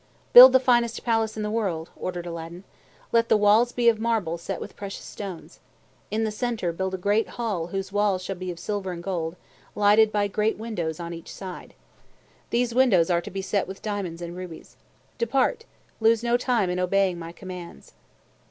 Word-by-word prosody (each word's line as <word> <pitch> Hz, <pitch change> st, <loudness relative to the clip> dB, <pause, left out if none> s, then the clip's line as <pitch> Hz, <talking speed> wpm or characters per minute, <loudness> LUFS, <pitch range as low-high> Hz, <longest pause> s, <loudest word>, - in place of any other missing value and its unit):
"Build 255 Hz, +2 st, +12 dB
the 260 Hz, -, +5 dB
finest 240 Hz, -2 st, +1 dB
palace 225 Hz, -2 st, 0 dB
in 215 Hz, -, -2 dB
the 210 Hz, -, -2 dB
world," 185 Hz, -8 st, -2 dB
ordered 175 Hz, -1 st, -5 dB
Aladdin. 170 Hz, +1 st, -7 dB, 0.5 s
"Let 230 Hz, 0 st, +2 dB
the -, -, +5 dB
walls 210 Hz, +4 st, +4 dB
be 240 Hz, -1 st, 0 dB
of 225 Hz, -2 st, +4 dB
marble 220 Hz, -8 st, -1 dB
set 175 Hz, +1 st, -5 dB
with -, -, -8 dB
precious 200 Hz, -1 st, -7 dB
stones. 190 Hz, -5 st, -8 dB, 0.5 s
In 220 Hz, +1 st, -1 dB
the 220 Hz, -, -1 dB
center 220 Hz, -5 st, -2 dB
build 190 Hz, +2 st, -3 dB
a -, -, -4 dB
great 205 Hz, +4 st, +1 dB
hall 210 Hz, -9 st, -2 dB
whose 195 Hz, +2 st, -4 dB
walls 205 Hz, -2 st, +1 dB
shall 195 Hz, -, -4 dB
be 185 Hz, 0 st, -6 dB
of 175 Hz, -, -5 dB
silver 190 Hz, +1 st, -3 dB
and 170 Hz, 0 st, -8 dB
gold, 170 Hz, -3 st, -3 dB, 0.4 s
lighted 210 Hz, +1 st, +5 dB
by 205 Hz, -1 st, +1 dB
great 210 Hz, +2 st, 0 dB
windows 180 Hz, -8 st, -4 dB
on 170 Hz, 0 st, -5 dB
each 165 Hz, -1 st, -9 dB
side. 185 Hz, -2 st, -9 dB, 0.7 s
These 240 Hz, 0 st, 0 dB
windows 210 Hz, -10 st, +4 dB
are 170 Hz, 0 st, +2 dB
to -, -, -8 dB
be 195 Hz, +1 st, -5 dB
set 200 Hz, 0 st, -1 dB
with 190 Hz, +1 st, -9 dB
diamonds 190 Hz, -5 st, -4 dB
and 170 Hz, 0 st, -6 dB
rubies. 180 Hz, -3 st, -9 dB, 0.4 s
Depart! 265 Hz, -, +1 dB, 0.3 s
Lose 225 Hz, 0 st, +3 dB
no 235 Hz, 0 st, +2 dB
time 240 Hz, -6 st, +1 dB
in 180 Hz, -, -2 dB
obeying 185 Hz, -1 st, +1 dB
my 165 Hz, 0 st, -7 dB
commands!" 180 Hz, -, -10 dB
200 Hz, 190 wpm, -25 LUFS, 180-225 Hz, 0.7 s, Build